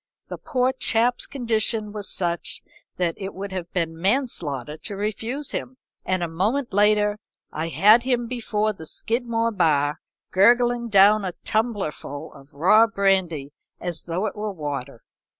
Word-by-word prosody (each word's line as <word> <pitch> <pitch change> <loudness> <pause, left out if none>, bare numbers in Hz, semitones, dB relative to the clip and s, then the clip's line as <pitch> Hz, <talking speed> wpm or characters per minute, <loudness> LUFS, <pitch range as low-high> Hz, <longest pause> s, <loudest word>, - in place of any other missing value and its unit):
The - - -6
poor 255 -2 +1
chap's 245 -1 +1
condition 225 -4 -1
was 205 -1 -4
such 175 -2 -2 0.3
that 175 -2 0
it 195 -1 -6
would 195 +1 -6
have 180 -2 -5
been 165 -3 -1
manslaughter 175 - -1
to 200 - -4
refuse 225 +8 -2
him, 255 +1 -5 0.3
and 185 -1 0
a - - 0
moment 210 +10 -1
later 210 +1 +3 0.3
I 160 +2 -3
had 200 - +6
him 245 -1 0
before 220 -3 -1
the 160 -5 -10
Skidmore 230 +2 -1
bar, 150 -7 +1 0.3
gurgling 240 +4 +4
down 205 +1 +6
a 185 -2 -3
tumblerful 195 - -2
of 140 +1 -17
raw 210 +9 +5
brandy 190 -9 0 0.3
as 175 -2 -5
though 175 +4 -2
it 205 - -3
were 210 0 -3
water. 140 -7 -6
205 Hz, 150 wpm, -24 LUFS, 170-230 Hz, 0.3 s, had